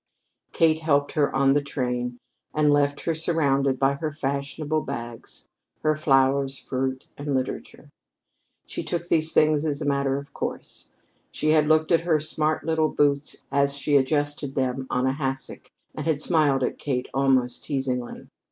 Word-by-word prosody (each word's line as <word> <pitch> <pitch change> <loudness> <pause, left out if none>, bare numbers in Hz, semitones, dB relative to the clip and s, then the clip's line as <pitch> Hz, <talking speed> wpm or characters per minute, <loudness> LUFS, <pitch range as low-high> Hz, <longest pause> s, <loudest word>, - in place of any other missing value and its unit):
Kate 160 -1 +3
helped 145 -3 +1
her 145 -2 +1
on 135 0 +4
the 145 +1 +3
train, 125 -3 -3 0.4
and 150 -1 +4
left 145 0 +1
her 165 - 0
surrounded 140 -5 +1
by 135 +1 +2
her 155 +2 -3
fashionable 145 +2 -2
bags, 120 -3 -7 0.4
her 155 0 +3
flowers, 135 -2 +2
fruit, 130 0 -3
and 145 -1 -2
literature. 130 0 -4 0.8
She - - -5
took 175 0 -3
these 160 -1 +2
things 155 -1 +3
as 145 -3 -1
a - - -4
matter 140 -1 +1
of 140 0 -9
course. - - -6 0.4
She 155 - -1
had 155 -1 +4
looked 155 +1 +3
at 165 - +4
her 165 -2 +2
smart 155 +1 0
little 160 -1 +2
boots 145 -1 0
as 140 0 +1
she 145 +1 0
adjusted 145 0 0
them 130 0 -1
on 125 +1 0
a 130 - +2
hassock 135 -2 -4 0.2
and 155 - -5
had 155 -3 +1
smiled 150 -5 +2
at - - -2
Kate 130 -3 -2
almost 130 -2 +1
teasingly. 130 -3 -3
140 Hz, 160 wpm, -25 LUFS, 135-155 Hz, 0.8 s, on